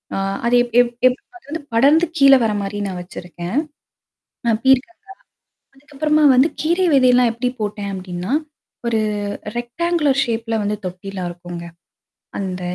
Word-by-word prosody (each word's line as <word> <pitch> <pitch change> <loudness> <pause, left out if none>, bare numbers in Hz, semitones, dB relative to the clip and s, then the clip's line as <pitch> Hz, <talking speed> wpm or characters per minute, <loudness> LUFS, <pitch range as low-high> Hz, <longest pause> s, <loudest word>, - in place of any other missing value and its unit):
ஆ - - -2 0.3
அது 240 +1 +3
எப் 240 -2 -10
எப் 240 0 -2
எப் 255 +1 0 0.2
அது 365 - -24
வந்து 320 +2 -4
படர்ந்து 285 +8 +5
கீழ 275 -2 +7
வர 220 - +1
மாரி 200 +1 -4
நான் 185 -2 -5
வச்சிருக்கேன். 175 +2 -7 0.9
அ - - +4
பீர்கங்கா. 265 +5 +3 0.8
அதுக்கப்புறமா 300 +2 0
வந்து 265 +6 +4
கீரை 345 +4 +1
விதையெல்லாம் 250 -2 +4
எப்படி 245 +2 -1
போட்டேன் 205 -1 -3
அப்படின்னா? 185 +3 -5 0.5
ஒரு 225 -2 +1 0.6
ரெக்ட்டாங்குலோர் 285 +3 0
ஷேப்ல 225 -1 -2
வந்து 205 +1 -1
தொட்டிலாம் 185 0 -5
இருக்குங்க. 175 0 -8 0.7
அந்த 185 -2 -4
235 Hz, 135 wpm, -19 LUFS, 195-275 Hz, 0.9 s, கீழ